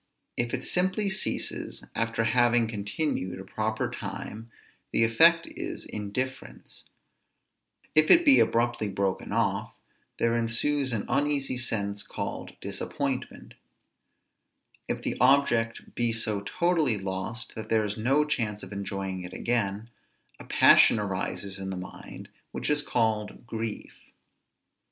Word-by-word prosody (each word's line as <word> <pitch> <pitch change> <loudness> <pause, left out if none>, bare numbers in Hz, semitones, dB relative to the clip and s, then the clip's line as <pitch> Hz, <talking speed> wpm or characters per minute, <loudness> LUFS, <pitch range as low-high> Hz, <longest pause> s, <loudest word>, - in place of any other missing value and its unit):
If 120 0 -1
it - - -6
simply 190 +3 +1
ceases 190 - -2
after 115 0 0
having 120 0 +3
continued 100 - -2
a - - -7
proper 110 +3 -2
time, 115 +2 -6 0.4
the - - +3
effect 165 +9 +5
is - - -5
indifference; 125 +6 -5 1.1
if 155 0 +4
it 340 0 +7
be 280 -2 +8
abruptly 120 -2 +1
broken 95 -1 -2
off, 105 -1 0 0.4
there 115 0 +2
ensues 125 +4 +1
an 110 -3 -2
uneasy 140 0 0
sense 105 -5 -1
called - - -5
disappointment; - - -4 1.3
if - - -3
the - - -2
object 125 -4 +3
be 120 -1 +1
so 110 -2 0
totally 165 - +1
lost 95 +4 -4
that 110 - -7
there 110 -1 +3
is 105 -1 -2
no 135 +7 +2
chance 110 -8 -2
of - - -9
enjoying 95 -2 -4
it 90 - -8
again, 110 -3 -1 0.5
a - - -10
passion - - +6
arises 95 -1 -2
in 95 0 -4
the 95 - -4
mind 90 - -9 0.2
which - - -2
is 150 0 +2
called 110 -3 -1
grief. 115 -2 -5
115 Hz, 130 wpm, -27 LUFS, 100-130 Hz, 1.3 s, be